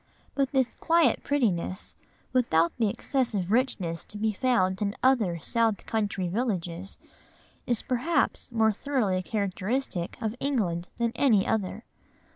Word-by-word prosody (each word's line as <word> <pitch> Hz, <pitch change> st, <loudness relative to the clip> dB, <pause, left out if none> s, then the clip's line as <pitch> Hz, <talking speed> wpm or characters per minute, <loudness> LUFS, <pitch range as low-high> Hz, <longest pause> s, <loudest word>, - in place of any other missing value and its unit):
But 275 Hz, -2 st, 0 dB
this 265 Hz, -3 st, +1 dB
quiet 335 Hz, 0 st, +3 dB
prettiness, 200 Hz, -10 st, 0 dB, 0.4 s
without 170 Hz, -10 st, +3 dB
the 220 Hz, -3 st, +3 dB
excessive 210 Hz, -6 st, -1 dB
richness 205 Hz, -9 st, 0 dB
to 210 Hz, -, -9 dB
be 215 Hz, +1 st, 0 dB
found 195 Hz, -5 st, +1 dB
in 205 Hz, 0 st, -1 dB
other 225 Hz, -10 st, +3 dB
south 225 Hz, +5 st, 0 dB
country 205 Hz, -4 st, -1 dB
villages, 185 Hz, -3 st, -2 dB, 0.7 s
is 240 Hz, -2 st, +1 dB
perhaps 255 Hz, +2 st, 0 dB
more 220 Hz, -2 st, +3 dB
thoroughly 215 Hz, -6 st, 0 dB
characteristic 200 Hz, 0 st, -2 dB
of 220 Hz, -1 st, -2 dB
England 190 Hz, -11 st, -1 dB
than 235 Hz, -1 st, +1 dB
any 230 Hz, -6 st, +3 dB
other. 215 Hz, +1 st, -1 dB
220 Hz, 125 wpm, -27 LUFS, 185-255 Hz, 0.7 s, quiet